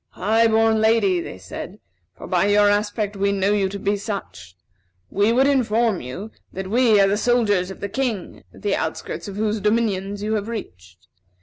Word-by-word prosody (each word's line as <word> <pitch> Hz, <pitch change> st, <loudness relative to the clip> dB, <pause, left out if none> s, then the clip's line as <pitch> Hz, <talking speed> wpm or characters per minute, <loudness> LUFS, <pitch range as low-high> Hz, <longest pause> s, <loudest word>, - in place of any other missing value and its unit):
"High 225 Hz, +4 st, +2 dB
born 220 Hz, 0 st, +3 dB
Lady," 220 Hz, -5 st, +3 dB
they 130 Hz, -, -7 dB
said, 95 Hz, -1 st, -8 dB, 0.4 s
"for -, -, -10 dB
by 180 Hz, +1 st, +1 dB
your 205 Hz, 0 st, +4 dB
aspect 205 Hz, 0 st, -1 dB
we 200 Hz, 0 st, +1 dB
know 200 Hz, +1 st, +1 dB
you 195 Hz, -2 st, +1 dB
to 200 Hz, -, -5 dB
be 200 Hz, +1 st, 0 dB
such, 195 Hz, -, -7 dB, 0.6 s
we 205 Hz, +3 st, +2 dB
would 255 Hz, +3 st, +3 dB
inform 235 Hz, -7 st, +2 dB
you 180 Hz, -, -7 dB, 0.2 s
that 190 Hz, 0 st, -6 dB
we 230 Hz, -3 st, +4 dB
are 195 Hz, -, +5 dB
the 200 Hz, +1 st, +1 dB
soldiers 210 Hz, -6 st, +1 dB
of 190 Hz, -, -10 dB
the 200 Hz, -, -2 dB
King, 235 Hz, -5 st, -3 dB
the -, -, -2 dB
outskirts -, -, -4 dB
of 200 Hz, -, -7 dB
whose 215 Hz, +1 st, -1 dB
dominions 205 Hz, -2 st, 0 dB
you 215 Hz, +1 st, -1 dB
have 210 Hz, -1 st, -2 dB
reached. 90 Hz, -, -8 dB
205 Hz, 185 wpm, -22 LUFS, 195-220 Hz, 0.6 s, are